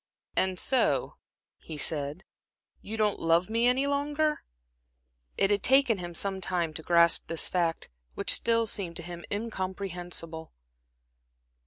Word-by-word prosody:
"And 185 Hz, -1 st, +2 dB
so," 260 Hz, +6 st, +1 dB, 0.4 s
he 155 Hz, -, -9 dB
said, 145 Hz, +3 st, -2 dB, 0.6 s
"you 220 Hz, +2 st, -6 dB
don't 210 Hz, -2 st, +1 dB
love 170 Hz, +4 st, +2 dB
me 230 Hz, +2 st, +3 dB
any 255 Hz, +3 st, +2 dB
longer?" 295 Hz, +2 st, 0 dB, 1.0 s
It 195 Hz, -, +3 dB
had 205 Hz, -1 st, +2 dB
taken 260 Hz, -5 st, +4 dB
him 175 Hz, -1 st, -7 dB
some 195 Hz, 0 st, 0 dB
time 175 Hz, -4 st, -1 dB
to 160 Hz, -, -6 dB
grasp 170 Hz, 0 st, +3 dB
this 165 Hz, -1 st, +1 dB
fact, 170 Hz, -, -1 dB, 0.2 s
which -, -, +3 dB
still 230 Hz, 0 st, +2 dB
seemed 190 Hz, -5 st, -2 dB
to 170 Hz, -, -7 dB
him 175 Hz, 0 st, -8 dB
incomprehensible. 185 Hz, -6 st, -4 dB
185 Hz, 135 wpm, -28 LUFS, 170-230 Hz, 1.0 s, taken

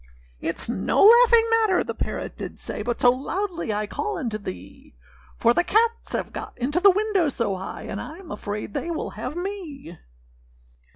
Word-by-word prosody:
â -, -, -4 dB
âItâs 165 Hz, -, -2 dB
no 235 Hz, -, +1 dB
laughing 465 Hz, +1 st, +8 dB
matter,â 440 Hz, -5 st, +3 dB
the -, -, -3 dB
parrot -, -, -4 dB
did -, -, -7 dB
say, -, -, -4 dB
âBut 240 Hz, +1 st, -2 dB
so 245 Hz, -, +7 dB
loudly 335 Hz, -, -3 dB
I 210 Hz, 0 st, -1 dB
call 425 Hz, -, -3 dB
unto 230 Hz, -8 st, -3 dB
thee; 95 Hz, -, -10 dB, 0.4 s
For 235 Hz, -, +4 dB
the 350 Hz, -, +3 dB
cats 455 Hz, +5 st, +1 dB
have -, -, -3 dB
got -, -, -7 dB
into 275 Hz, +7 st, 0 dB
the 400 Hz, +2 st, +7 dB
window 395 Hz, -4 st, +2 dB
so 230 Hz, -7 st, -1 dB
high, 190 Hz, +1 st, -7 dB
And 200 Hz, -, -5 dB
Iâm 335 Hz, -, -8 dB
afraid 205 Hz, 0 st, -5 dB
they 340 Hz, -, -3 dB
will 330 Hz, -2 st, -3 dB
have -, -, -6 dB
me. 345 Hz, -, -6 dB
315 Hz, 180 wpm, -24 LUFS, -, 0.4 s, laughing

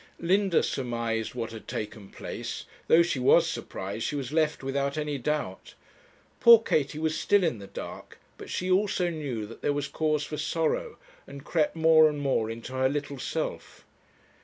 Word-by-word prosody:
Linda 190 Hz, +1 st, +2 dB
surmised 115 Hz, -3 st, -2 dB
what 115 Hz, -2 st, -3 dB
had 110 Hz, -1 st, -10 dB
taken 105 Hz, -2 st, -6 dB
place; -, -, -6 dB, 0.2 s
though 170 Hz, +1 st, +6 dB
she 170 Hz, -6 st, -1 dB
was 125 Hz, -, +5 dB
surprised, 100 Hz, +4 st, -5 dB
she -, -, -2 dB
was 135 Hz, -3 st, -4 dB
left 155 Hz, -3 st, +1 dB
without 140 Hz, +2 st, -1 dB
any 150 Hz, -2 st, -2 dB
doubt. 135 Hz, -8 st, -3 dB, 0.6 s
Poor 235 Hz, 0 st, +10 dB
Katie 155 Hz, -10 st, 0 dB
was 155 Hz, 0 st, 0 dB
still 205 Hz, -2 st, +3 dB
in 155 Hz, -11 st, 0 dB
the 100 Hz, -, -9 dB
dark, -, -, -8 dB, 0.2 s
but -, -, -11 dB
she 185 Hz, +1 st, -2 dB
also 185 Hz, -2 st, +2 dB
knew 135 Hz, -9 st, -4 dB
that 115 Hz, +2 st, -12 dB
there 145 Hz, -, +1 dB
was 145 Hz, 0 st, -2 dB
cause 155 Hz, -1 st, 0 dB
for 150 Hz, +1 st, -5 dB
sorrow, 165 Hz, -, -1 dB, 0.3 s
and 140 Hz, 0 st, -10 dB
crept 160 Hz, -2 st, +1 dB
more 160 Hz, -1 st, +6 dB
and 150 Hz, -1 st, -4 dB
more 135 Hz, -6 st, 0 dB
into 115 Hz, +3 st, -7 dB
her 130 Hz, 0 st, +2 dB
little 145 Hz, -1 st, -4 dB
self. -, -, -4 dB
145 Hz, 175 wpm, -28 LUFS, 120-160 Hz, 0.6 s, Poor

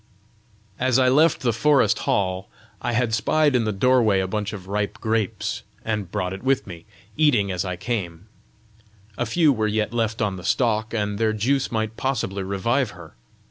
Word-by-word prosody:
As 130 Hz, -1 st, +2 dB
I 130 Hz, -1 st, +4 dB
left 150 Hz, +4 st, +4 dB
the 120 Hz, -3 st, +1 dB
forest 135 Hz, -2 st, +3 dB
hall, 95 Hz, 0 st, 0 dB, 0.3 s
I 120 Hz, -, -2 dB
had 115 Hz, -1 st, +1 dB
spied 150 Hz, +4 st, +2 dB
in 120 Hz, -2 st, +2 dB
the 110 Hz, -, 0 dB
doorway 110 Hz, -1 st, +3 dB
a 95 Hz, -, 0 dB
bunch 105 Hz, +2 st, -3 dB
of 100 Hz, -3 st, -8 dB
ripe 100 Hz, +1 st, -2 dB
grapes, 110 Hz, -3 st, -1 dB, 0.2 s
and 105 Hz, -5 st, -2 dB
brought 95 Hz, -3 st, -2 dB
it 95 Hz, -, -7 dB
with 135 Hz, 0 st, +1 dB
me, 85 Hz, -4 st, -10 dB, 0.3 s
eating 120 Hz, -11 st, +3 dB
as 90 Hz, -1 st, -1 dB
I 90 Hz, -2 st, -3 dB
came: 90 Hz, -3 st, -4 dB, 0.9 s
a 120 Hz, -, -2 dB
few 155 Hz, +4 st, +3 dB
were 110 Hz, -3 st, 0 dB
yet 105 Hz, +1 st, -1 dB
left 115 Hz, -1 st, -1 dB
on 100 Hz, -3 st, -1 dB
the 90 Hz, -, -9 dB
stalk, 110 Hz, -2 st, +1 dB
and 105 Hz, -2 st, -2 dB
their 110 Hz, -1 st, +2 dB
juice 135 Hz, +6 st, 0 dB
might 110 Hz, -1 st, -2 dB
possibly 115 Hz, -7 st, -2 dB
revive 105 Hz, +7 st, 0 dB
her! 85 Hz, -3 st, -12 dB
110 Hz, 180 wpm, -23 LUFS, 100-125 Hz, 0.9 s, I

